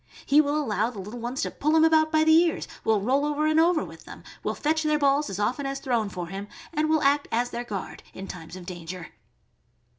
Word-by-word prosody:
He 290 +2 +6
will 290 0 -1
allow 220 -5 0
the 240 - -11
little 210 +5 -7
ones 245 +5 -3
to - - -2
pull 305 +2 0
him 320 - +5
about 315 -1 +4
by 310 -1 +4
the 315 0 +5
ears, 330 0 +3 0.2
will 220 -2 +2
roll 265 +7 +2
over 295 +1 0
and 310 +1 +3
over 330 -1 +3
with - - -13
them, - - -11 0.2
will - - -2
fetch 315 +2 0
their 305 -1 +2
balls 285 0 +2
as 195 - -4
often 250 +7 -1
as 275 0 -3
thrown 235 -6 0
for 180 -2 -5
him, 195 +4 -7 0.3
and 310 0 0
will 315 -1 +2
act 285 +1 +3
as 240 +2 0
their 240 - -4
guard 205 -5 -6
in 195 - -8
times 165 -1 -9
of 185 -1 -9
danger. 175 -1 -7
275 Hz, 240 wpm, -26 LUFS, 205-310 Hz, 0.3 s, He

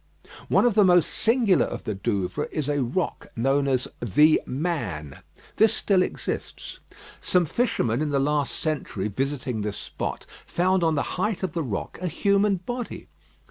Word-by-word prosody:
One - - +4
of 240 - +4
the 210 0 +5
most 180 -3 +5
singular 225 -5 +3
of - - -6
the 105 - -2
Douvres 100 +7 -2
is 150 -3 -2
a 145 -1 +1
rock 130 +9 -2
known 135 +4 +1
as 130 -2 +1
"The 150 +8 +4
Man." 120 - -3 0.4
This 220 0 +5
still 195 -3 +2
exists. - - -4 0.4
Some 180 -1 +2
fisherman 140 - 0
in 155 - 0
the 140 - +1
last 145 +1 0
century 135 -10 -2
visiting 130 0 -2
this 105 -1 -3
spot - - -5 0.2
found 185 +1 +1
on 160 -1 +2
the 140 - +1 0.2
height 210 -1 -1
of 190 - -1
the 170 - -2
rock 115 -10 -4
a 185 - -1
human 200 +3 +2
body. 240 +7 -6
150 Hz, 165 wpm, -25 LUFS, 125-185 Hz, 0.4 s, the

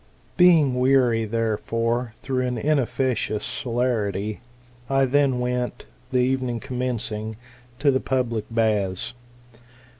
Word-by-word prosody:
" - - -34
Being 160 -8 +5
weary, 125 -3 +3
therefore, 115 +1 -1
though 130 -1 -2
an 125 -1 -1
inefficacious 130 -5 0
celerity, 110 -4 -1 0.5
I 135 0 +3
then 135 -1 +2
went, 125 0 -2 0.3
the 130 - +1
evening 125 -1 +1
commencing, 120 -4 -3 0.4
to 140 +1 +3
the 130 - +2
public 120 -6 -1
baths. 110 -1 0
125 Hz, 110 wpm, -24 LUFS, 115-130 Hz, 0.5 s, Being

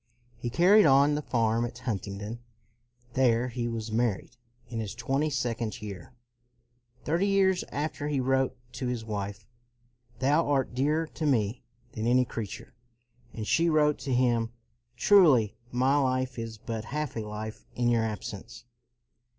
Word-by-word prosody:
He 120 - -3
carried 185 - +6
on 140 +2 +5
the 150 - -1
farm 115 -4 +1
at 120 0 -4
Huntingdon. 105 -2 -4 0.7
There 125 -1 +2
he 120 -1 -3
was 115 -1 -4
married, 115 0 -1 0.3
in 115 - -5
his 110 -1 -4
twenty 135 +6 0
second 120 -5 -2
year. 105 +3 -9 0.9
Thirty 170 +6 +1
years 190 -2 +3
after 145 0 -3
he 145 -2 0
wrote 130 0 +1
to 125 +1 -4
his 120 -2 -3
wife, 100 -1 -5 0.4
" 120 0 -36
Thou 145 +4 +2
art 135 -3 +1
dearer 150 +6 +1
to 155 0 -4
me 115 -3 +1 0.3
than 110 +1 -3
any 125 +1 +4
creature"; 115 +1 -7 0.6
and 110 - -5
she 170 +8 +3
wrote 150 -2 +3
to 135 - -4
him, 120 -2 +2 0.2
" 120 0 -44
Truly 135 - +5 0.2
my 130 +3 +2
life 130 -2 0
is 115 -1 -5
but 110 +1 -5
half 150 +4 -3
a - - -2
life 110 0 -6
in 120 0 +1
your 115 -1 +2
absence.'' 110 +2 -6
120 Hz, 155 wpm, -28 LUFS, 115-140 Hz, 0.9 s, carried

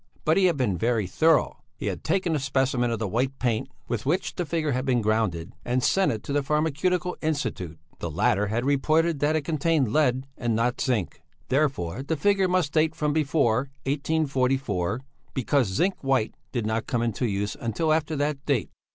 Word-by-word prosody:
But 160 - +4
he 195 - +4
had 170 -5 +3
been 105 -10 0
very 115 -1 +1
thorough. 160 - +2 0.2
He - - -7
had - - -3
taken 180 -4 +1
a - - 0
specimen 130 -2 +1
of 115 - -1
the 110 -1 -2
white 130 +7 -1
paint 120 -4 -1 0.2
with 120 -3 -2
which 165 +8 0
the 175 - -3
figure 155 -2 0
had 130 0 0
been 130 -3 +2
grounded, 105 -7 0
and 125 +1 0
sent 195 +6 +3
it 110 - -4
to 140 - -4
the 145 - +2
Pharmaceutical 160 +5 0
Institute; 140 - -2 0.2
the 85 - -3
latter 105 +5 +1
had 115 +4 -1
reported 155 +3 +2
that 150 +2 +2
it 155 - 0
contained 155 -5 +1
lead 130 -4 +2
and 120 -3 0
not 120 +2 0
zinc; 115 -9 -1 0.3
therefore, 130 - 0
the 155 +4 -2
figure 195 +4 +3
must 180 -5 +1
date 155 0 +2
from 150 -1 0
before 140 -5 +1 0.2
1844, 135 - 0 0.3
because 130 -1 +2
zinc 175 - +1
white 130 -5 +1 0.2
did 120 -4 -2
not 110 +1 -1
come 120 -2 0
into 120 +1 -1
use 100 -1 -2
until 155 +8 0
after 155 0 0
that 145 -1 -1
date. 135 -9 0
135 Hz, 190 wpm, -26 LUFS, 115-155 Hz, 0.3 s, But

